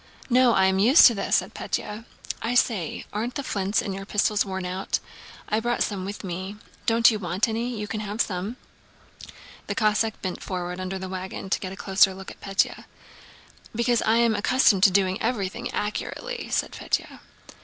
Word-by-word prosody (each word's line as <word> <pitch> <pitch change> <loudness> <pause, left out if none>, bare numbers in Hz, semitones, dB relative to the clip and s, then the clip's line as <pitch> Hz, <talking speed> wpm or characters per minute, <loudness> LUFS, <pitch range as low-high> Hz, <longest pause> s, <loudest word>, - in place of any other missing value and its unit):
"No, 250 -1 +5
I 190 - +4
am 190 0 +2
used 250 - +8
to 240 - +8
this," 195 -2 0
said - - 0
Pétya. 215 +2 -4 0.4
"I 230 +3 -1
say, 210 -9 +1
aren't 230 +4 -3
the 280 - -3
flints 200 -4 0
in 195 - -3
your 195 +1 -6
pistols 210 +1 +1
worn 190 -2 -4
out? 185 +2 -1 0.5
I 215 - +1
brought 240 +1 0
some 195 -3 -3
with 200 +2 -6
me. 185 +2 -5 0.3
Don't 230 +1 +6
you 215 - -2
want 185 +3 0
any? 230 +2 -2
You 210 0 -4
can 215 - -3
have 210 +1 -5
some." 200 +3 -1 1.1
The - - -2
Cossack 215 0 +1
bent 185 -2 -4
forward 180 -1 -4
from - - -5
under 185 +1 -3
the 190 0 -5
wagon 190 +1 -6
to - - +2
get 185 - -5
a - - -7
closer 195 0 +3
look 190 0 -9
at - - -15
Pétya. 195 -1 0 0.9
"Because 235 +1 +2
I 220 - +3
am 235 -1 +4
accustomed 215 -2 +3
to - - +8
doing 190 0 +1
everything 230 0 -2
accurately," 475 - -4
said - - 0
Pétya. - - -3
205 Hz, 190 wpm, -25 LUFS, 190-230 Hz, 1.1 s, used